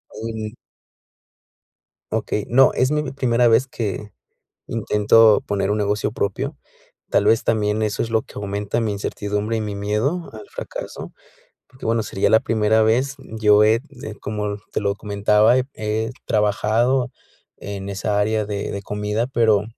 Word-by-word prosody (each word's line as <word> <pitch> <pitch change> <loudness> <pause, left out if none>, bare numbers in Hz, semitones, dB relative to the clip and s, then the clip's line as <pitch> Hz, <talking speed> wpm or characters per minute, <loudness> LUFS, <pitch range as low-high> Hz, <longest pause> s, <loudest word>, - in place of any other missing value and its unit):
Um. 110 0 -5 1.6
Okey, 105 -1 -1
no, 135 +3 +5
es 130 +1 +2
mi 150 -2 -1
primera 120 -3 +2
vez 125 +4 +4
que, 105 -4 -4 0.5
intento 110 -1 +4
poner 100 0 -1
un 105 - +1
negocio 105 +1 0
propio. 100 -4 -2 0.6
Tal - - +3
vez 115 +1 +3
también 110 -1 +1
eso 105 -2 0
es 115 - -4
lo 110 -1 +2
que - - -17
aumenta 100 +2 -2
mi 110 -2 0
incertidumbre 105 +2 -2
y - - -1
mi 105 -1 -4
miedo 105 - -1
al 410 - -10
fracaso, - - -7 0.6
porque 130 - -13
bueno, 115 0 +1
sería 95 - 0
la 110 - +7
primera 110 0 +2
vez. 130 +6 +1
Yo 105 -4 +3
ed 110 +3 +3 0.2
eh, 110 - -6
como 105 -1 -3 0.2
te - - 0
lo 100 -1 0
comentaba, 105 +3 +3 0.2
he 110 +1 -2 0.2
trabajado 115 +5 +1 0.5
en 100 -1 -6
esa 100 +1 -1
área 110 0 0
de 100 -1 -3
de 100 0 -5
comida, 105 +3 -2
pero 110 -5 +2
110 Hz, 150 wpm, -21 LUFS, 105-115 Hz, 1.6 s, la